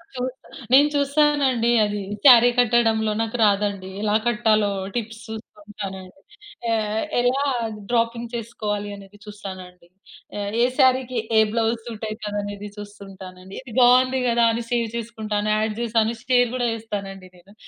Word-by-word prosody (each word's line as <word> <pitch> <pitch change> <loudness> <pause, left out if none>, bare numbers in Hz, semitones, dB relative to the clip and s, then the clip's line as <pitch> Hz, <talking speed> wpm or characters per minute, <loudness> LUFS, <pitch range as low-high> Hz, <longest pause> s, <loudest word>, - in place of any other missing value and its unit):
చూస్తా, 255 0 -5 0.3
నేను 285 +3 +7
చూస్తానండి 280 -4 +2
అది 205 0 -3 0.2
శారీ 245 -2 +9
కట్టడంలో 225 -2 +2
నాకు 225 +2 -3
రాదండి. 200 -2 0
ఎలా 210 0 +1
కట్టాలో, 215 -3 +2 0.3
టిప్స్ 225 -1 -4
చూసుకుంటానండి. 205 -4 -9 0.6
ఎ - - +3 0.5
ఎలా 250 +3 +1 0.5
డ్రాపింగ్ 235 0 -1
చేసుకోవాలి 210 -3 -4
అనేది 200 0 -14
చూస్తానండి. 185 -4 -10 0.5
ఏ - - -3 0.2
ఏ - - +5
శారీకి 260 -2 +3 0.2
ఏ - - +7
బ్లౌజ్ 225 0 0
సూట్ 225 -2 -6
అయితది 215 -1 -5
అనేది 205 0 -7
చూస్తుంటానండి. 195 -2 -11
ఇది 255 -4 -12
బావుంది 255 +1 +5
గదా! 235 0 +3
అని 235 +1 -3
సేవ్ 235 -2 +1
చేసుకుంటాను. 215 -2 -3
యాడ్ 215 0 -1
చేశాను, 225 0 +1
షేర్ 245 -2 +3
కూడా 245 -1 0
చేస్తానండి 200 -4 -7
నేను. 190 +3 -20
225 Hz, 130 wpm, -22 LUFS, 205-240 Hz, 0.6 s, శారీ